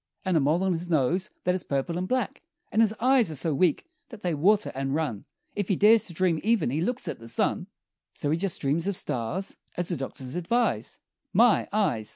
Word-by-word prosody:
And 185 -2 +1
a - - +5
mole 155 +6 +2
on 190 -1 +2
his 175 +1 -4
nose 165 +4 +1
that 180 - +2
is 185 - -2
purple 140 +4 -2
and 180 +1 -2
black; 255 -2 -1 0.3
And 220 - +3
his 220 -2 +4
eyes 250 -4 +4
are 155 - -4
so 150 +3 -1
weak 165 +2 +2 0.2
that 230 -4 -12
they 175 -2 0
water 200 +8 +2
and 135 +1 -2
run 140 -11 -2 0.3
If 205 -3 -2
he 195 - +2
dares 215 +4 +5
to 175 - -7
dream 170 -2 +1
even 220 - +1
he 150 +4 -1
looks 245 +8 -2
at - - -4
the 115 - -11
sun, 115 - 0 0.5
So 145 - -2
he 160 - +2
just 190 0 -2
dreams 150 +5 0
of 200 - 0
stars, 170 +9 -2 0.2
as 175 0 -2
the 175 - -1
doctors 130 -1 -6
advise 230 +8 -1 0.3
My! 235 0 +4
Eyes! 155 - 0
175 Hz, 220 wpm, -27 LUFS, 145-205 Hz, 0.5 s, a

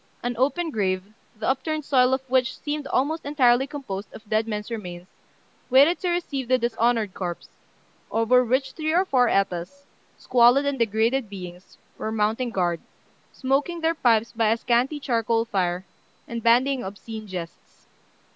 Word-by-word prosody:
An 245 0 -2
open 315 +6 0
grave, 185 -5 0 0.3
the 215 - -3
upturned 300 +3 -1
soil 255 -2 +4
of 265 0 -1
which 255 0 +1
seemed 295 -1 -4
almost 310 +6 0
entirely 265 -3 +3
composed 210 -9 -6
of 220 - -13
dead 220 +1 +1
men's 210 +1 -4
remains, 180 -6 -6 0.6
waited 280 +7 +5
to 360 - -1
receive 300 -7 -2
the 255 +1 +4
dishonoured 230 -3 0
corpse, 175 -2 -5 0.6
over 230 +3 +3
which 260 +2 0
three 315 +1 -2
or 365 +3 +3
four 255 -8 +3
Etas, 195 +8 -1 0.3
squalid 245 +3 +4
and 280 -2 -1
degraded 225 +2 +1
beings, 180 -2 -10 0.2
were 220 - -3
mounting 225 +3 0
guard, 175 -6 -1 0.5
smoking 285 +6 -1
their 325 +1 +2
pipes 230 -7 +2
by 225 -2 +1
a 225 - +2
scanty 250 +6 +1
charcoal 230 -3 0
fire, 180 -4 -1 0.4
and 235 0 -5
bandying 250 +3 +3
obscene 215 +3 -8
jests. 175 -3 -9
240 Hz, 155 wpm, -24 LUFS, 215-270 Hz, 0.6 s, waited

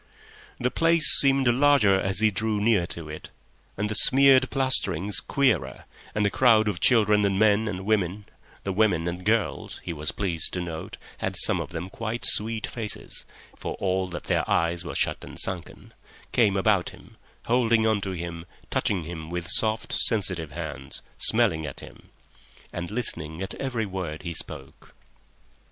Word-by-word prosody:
The 125 +1 0
place 165 -2 +4
seemed 135 -1 +3
larger 130 -4 +4
as 95 +1 +1
he 110 -1 +4
drew 105 +1 -1
near 105 -5 +2
to 85 -2 -7
it, 75 0 -9 0.5
and 105 +1 -1
the 105 - -3
smeared 130 +2 +5
plasterings 100 - +1
queerer, 80 - 0 0.3
and 105 -1 +1
a 100 - +1
crowd 110 -4 +4
of 100 -5 -2
children 105 -1 +4
and 100 -1 +1
men 110 +1 +3
and 95 -2 -5
women 100 -1 -1 0.4
(the 95 - -3
women 95 -5 +1
and 90 +1 -5
girls 110 +1 -1
he 85 - -4
was 75 -1 -3
pleased 90 -5 -2
to 90 - -2
note 85 -2 -6 0.2
had, - - -3
some - - +3
of - - -7
them, 90 - -6
quite 115 +4 -4
sweet 110 +1 +1
faces, 110 -3 -5 0.3
for - - -6
all 95 -1 -1
that 85 -1 -7
their - - 0
eyes 85 +1 0
were 85 - -7
shut - - 0
and - - -7
sunken) 95 -3 -4 0.4
came 105 -5 +2
about 95 -2 +2
him, - - -17 0.3
holding 115 -2 +2
on 110 -2 +1
to 95 - -4
him, 85 -1 -7 0.2
touching 95 -5 0
him 80 -1 -8
with 90 0 -4
soft, 110 +2 0
sensitive 95 -8 0
hands, 75 -4 -7 0.2
smelling 80 0 +3
at 70 - -8
him, - - -14 0.6
and 85 0 -5
listening 85 -8 -3
at 95 - -4
every 125 -5 -3
word 90 -5 -6
he 85 -2 -4
spoke. 70 -3 -5
100 Hz, 170 wpm, -25 LUFS, 85-110 Hz, 0.6 s, smeared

